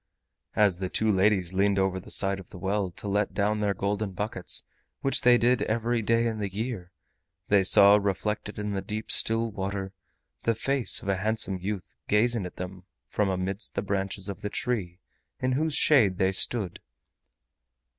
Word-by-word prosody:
As 100 -4 +3
the 95 -1 -3
two 110 +3 +1
ladies 95 -2 +2
leaned 100 +1 +2
over 95 -1 +1
the - - -13
side 100 0 0
of 95 - -12
the - - -11
well 95 +1 -1
to 90 +4 -9
let 100 0 0
down 105 +1 +1
their 100 -1 0
golden 100 +1 -2
buckets, 100 -2 -2 0.4
which 135 - +2
they 125 0 +6
did 120 +1 +2
every 115 +1 0
day 115 +2 +2
in 110 -2 -2
the 100 -2 -3
year, 105 -3 -5 0.6
they 100 -1 +5
saw 100 +2 +6
reflected 105 +1 -2
in 105 0 -3
the 100 -1 -2
deep 105 +3 -4
still 115 0 +4
water 95 -1 -4 0.5
the 115 - +1
face 135 +2 +1
of - - -9
a 100 -1 +1
handsome 105 -1 -1
youth 95 +1 -5
gazing 110 -1 +2
at - - -13
them 90 0 -8 0.2
from 105 -2 0
amidst 95 +2 -3
the 100 - -1
branches 100 -1 -3
of 100 -3 -6
the 105 - -3
tree 100 -7 -3 0.4
in 130 - 0
whose 150 +3 0
shade 115 -12 +4
they 95 0 +2
stood. 95 -1 +1
100 Hz, 180 wpm, -27 LUFS, 95-110 Hz, 0.6 s, they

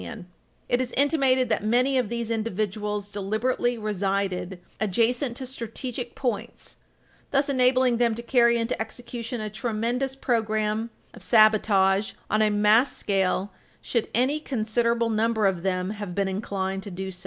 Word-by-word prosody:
[Footnote 85 -2 -7
3/8] - - -17 0.4
It 245 - +2
is 250 -1 -3
intimated 270 -3 +2
that 220 - 0
many 250 +5 +2
of 250 -5 +1
these 235 -1 -3
individuals 210 -1 -2
deliberately 220 +5 -1
resided 195 -3 -2 0.2
"adjacent 235 +5 +1
to 265 - -5
strategic 245 0 -6
points," 235 -3 -4 0.5
thus 280 +1 +1
enabling 255 -2 +3
them 235 -2 +2
"to 235 - -6
carry 235 -1 +4
into 230 0 -2
execution 235 +1 -5
a 215 - -3
tremendous 240 +4 -2
program 220 -3 0 0.2
of - - -13
sabotage 210 -3 +4 0.2
on 215 - +3
a 215 - +4
mass 210 +5 +3
scale 195 0 0 0.3
should 235 -3 -1
any 260 +6 +2
considerable 235 -3 0
number 220 0 +1
of 190 -3 +1
them 185 0 -1
have 205 -4 -6
been 200 -1 +1
inclined 190 -1 -3
to 200 - -7
do 190 +1 -5
so. 180 - -8
220 Hz, 155 wpm, -25 LUFS, 205-245 Hz, 0.5 s, carry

